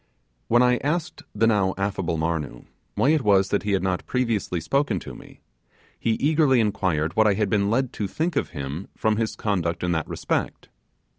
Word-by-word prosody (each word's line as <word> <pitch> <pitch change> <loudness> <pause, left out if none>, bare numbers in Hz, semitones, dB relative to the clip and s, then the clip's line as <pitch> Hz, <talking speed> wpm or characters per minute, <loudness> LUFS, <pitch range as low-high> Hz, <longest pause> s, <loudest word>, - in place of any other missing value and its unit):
When 120 +2 +4
I 125 0 +4
asked 155 +5 -2
the 110 +2 +3
now 100 -4 +2
affable 95 -4 -1
Marnoo 80 -6 -3 0.3
why 135 - +2
it 155 -1 +3
was 100 -3 +3
that 100 - +1
he 105 -1 -1
had 95 - +1
not 95 -1 -2
previously 115 -8 -1
spoken 125 - 0
to - - -8
me, - - -14 0.6
he 115 - +1
eagerly 145 0 +3
inquired 90 -7 0
what 110 0 +4
I 100 - +3
had 105 -1 0
been 100 -1 +2
led 130 +3 0
to 105 - -3
think 160 - -2
of 145 - 0
him 75 +3 -6
from 110 -1 +1
his 110 -1 -1
conduct 90 -5 -1
in 90 - 0
that 80 -2 -1
respect. - - -3
105 Hz, 195 wpm, -24 LUFS, 90-120 Hz, 0.6 s, When